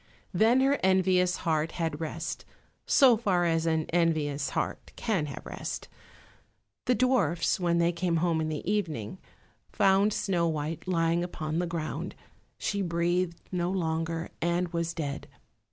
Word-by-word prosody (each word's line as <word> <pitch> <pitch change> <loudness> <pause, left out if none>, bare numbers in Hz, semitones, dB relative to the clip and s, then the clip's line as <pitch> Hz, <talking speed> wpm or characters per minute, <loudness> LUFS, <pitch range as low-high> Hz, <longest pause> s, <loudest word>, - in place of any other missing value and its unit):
Then 225 +8 +4
her 275 +2 +3
envious 185 -1 +3
heart 160 0 +1
had 165 -3 -2
rest, 160 - -4 0.4
so 260 -4 +6
far 190 -6 +1
as 165 -1 +1
an 160 -1 +1
envious 155 -4 +1
heart - - -3
can 195 -10 -1
have 140 - -8
rest. - - -5 1.0
The 250 - +3
dwarfs, 205 - +2
when 170 -1 +1
they 170 0 +3
came 175 0 -1
home 165 -1 +1
in 155 - -1
the 155 +1 -4
evening, 170 - -2 0.5
found 195 +2 +4
Snow 175 -5 0
white 155 +2 -3
lying 170 -1 +1
upon 160 -2 -3
the 175 - 0
ground; 165 -2 -4 0.4
she 200 -1 -1
breathed 170 0 0
no 175 -1 0
longer 165 -2 -2
and 175 +1 +1
was 170 0 -2
dead. 145 -4 -4
170 Hz, 145 wpm, -28 LUFS, 160-185 Hz, 1.0 s, so